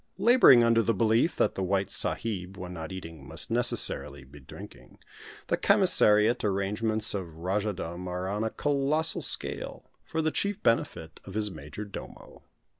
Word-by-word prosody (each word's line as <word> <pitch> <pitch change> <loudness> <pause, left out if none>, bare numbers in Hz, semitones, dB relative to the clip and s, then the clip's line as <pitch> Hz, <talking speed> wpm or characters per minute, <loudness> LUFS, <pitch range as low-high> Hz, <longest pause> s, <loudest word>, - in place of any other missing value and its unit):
Labouring 235 - +6
under 115 0 +3
the 115 -1 0
belief 115 - +1
that - - +1
the - - -5
white 95 +1 -1
sahib 95 -4 0
when 90 -1 -8
not 80 -1 -7
eating 80 -6 -9
must - - 0
necessarily 70 0 +2
be 70 +2 -15
drinking, 65 - -13 0.5
the - - -1
commissariat 105 +4 +3
arrangements 105 +2 -1
of 90 -5 -6
Rajahdom 90 -1 -4
are 90 +1 -4
on 105 +3 -3
a 110 - -1
colossal 145 +5 0
scale - - -3
for 160 0 -3
the 155 - 0
chief 200 +4 -3
benefit 80 -8 -1
of 95 - -10
his 105 -1 -1
major 80 +6 -9
domo. 100 - -11
100 Hz, 155 wpm, -27 LUFS, 90-115 Hz, 0.5 s, Labouring